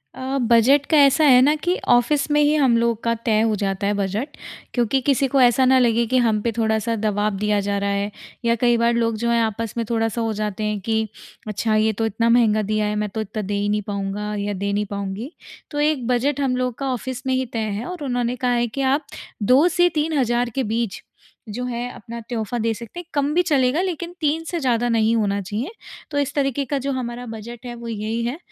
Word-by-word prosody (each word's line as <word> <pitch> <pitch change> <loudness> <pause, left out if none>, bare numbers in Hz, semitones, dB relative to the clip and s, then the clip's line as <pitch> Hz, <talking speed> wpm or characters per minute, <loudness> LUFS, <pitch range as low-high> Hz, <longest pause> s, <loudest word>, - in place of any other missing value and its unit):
अ, 265 +1 -3
budget 255 +5 +5
का 310 - +5
ऐसा 285 +2 +5
है 255 -4 +7
न 290 +4 +4
कि 355 +1 +1
ऑफिस 260 +5 +3
में 295 - +4
ही 295 0 +4
हम 265 -6 +4
लोग 230 -1 0
का 230 - +2
तय 215 -2 +3
हो 220 -1 +2
जाता 200 0 -2
है 205 - +1
बजट, 205 +8 -3 0.4
क्योंकि 245 +2 +1
किसी 275 +1 +2
को 270 +1 +2
ऐसा 250 +1 +5
न 260 +1 +5
लगे 235 -1 +3
कि - - +5
हम 225 -4 +2
पे 235 - 0
थोड़ा-सा 220 0 +1
दबाव 210 -1 0
दिया 210 +1 +1
जा 200 0 -1
रहा 200 0 -1
है, 200 +1 -1 0.3
या 235 0 +3
कई 240 -1 +4
बार 235 +1 +2
लोग 230 -1 0
जो 235 +2 -1
है 235 0 +3
आपस 225 0 -2
में 230 - -1
थोड़ा-सा 225 0 0
हो 225 -1 0
जाते 210 0 -3
हैं 210 -1 -1
कि 220 -1 0 0.4
अच्छा 215 +1 0
ये 215 +1 +3
तो 225 +2 -1
इतना 225 +2 0
महँगा 225 -3 +4
दिया 215 +1 0
है 210 0 -1
मैं 210 0 -1
तो 220 +3 -4
इतना 215 +1 -4
दे 205 0 -4
ही 205 0 0
नहीं 210 0 +1
पाऊँगा 205 +1 -3
या 205 0 -2
दे 200 +1 -2
नहीं 205 +1 0
पाऊँगी। 200 +5 -5 0.4
तो 290 - -3
एक 295 -5 +1
बजट 260 +3 +1
हम 260 -2 +1
लोग 250 -1 -1
का 275 - -3
ऑफिस 260 +2 -5
में 260 - +2
ही 260 0 0
तय 230 - -1 0.2
है 235 - -5
और 360 -4 -6
उन्होंने 245 -2 -1
कहा 250 -1 0
है 240 0 +1
कि 275 +5 -4
आप 290 +1 -1 0.4
2 260 - +5
से 355 +1 +3
3 315 +2 -1
हज़ार 240 -2 +1
के 265 - +1
बीच 225 -1 -2 0.5
जो 235 +4 -4
है 245 0 -3
अपना 230 +2 -8
तोहफ़ा 235 0 -3
दे 225 0 0
सकते 235 +9 -9
हैं, 350 - -8
कम 285 0 0
भी 350 - +4
चलेगा 285 -2 +2
लेकिन 350 -2 -3
3 310 +2 +1
से 345 - -1
ज़्यादा 245 -4 +1
नहीं 225 0 +2
होना 200 -3 +1
चाहिए। 215 - -4 0.4
तो 290 - -2
इस 285 0 -1
तरीके 275 -1 0
का 285 +2 -1
जो 275 +1 -2
हमारा 245 -2 -4
बजट 225 +1 -8
है 240 - -5
वो 235 0 -9
यही 225 +1 -3
है, 245 +5 -2
235 Hz, 240 wpm, -22 LUFS, 215-265 Hz, 0.5 s, है